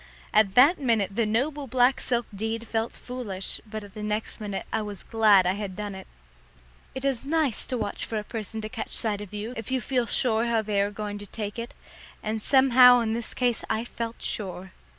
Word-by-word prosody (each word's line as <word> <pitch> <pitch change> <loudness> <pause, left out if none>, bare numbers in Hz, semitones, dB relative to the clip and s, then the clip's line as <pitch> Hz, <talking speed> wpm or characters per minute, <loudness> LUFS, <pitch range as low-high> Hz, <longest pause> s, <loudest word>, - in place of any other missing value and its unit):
At 210 -2 +4
that 285 +8 +7
minute 220 -7 +1
the 230 -1 +1
noble 275 +6 -1
black 255 +1 +3
silk 240 -1 0
deed 225 +3 -3
felt 225 +1 -1
foolish, 220 -7 -5
but 215 0 -6
at 200 -2 -13
the 215 - -7
next 210 +1 -3
minute 205 -2 -4
I 220 - +1
was 205 -2 -7
glad 215 -4 +5
I 180 - +2
had 200 -2 -5
done 205 0 -5
it. 190 0 -9 0.9
It 265 +1 -4
is 265 -4 0
nice 295 -3 0
to 255 - -2
watch 210 -3 -3
for 225 - -3
a 210 - -2
person 220 0 -5
to 215 - -4
catch 225 0 -5
sight 210 -2 +1
of 205 - -9
you 210 +3 -5
if 225 -4 -6
you 260 0 +1
feel 250 0 0
sure 230 -1 +2
how 230 -2 +1
they 205 -2 +1
are 200 - +1
going 205 0 -5
to 205 - -8
take 210 +2 -5
it, 235 +1 -6 0.5
and 220 0 -2
somehow 250 -1 +7
in 220 -1 -1
this 235 0 -4
case 245 -2 0
I 225 +2 -1
felt 230 -1 -6
sure. 190 -2 -4
220 Hz, 215 wpm, -26 LUFS, 210-245 Hz, 0.9 s, that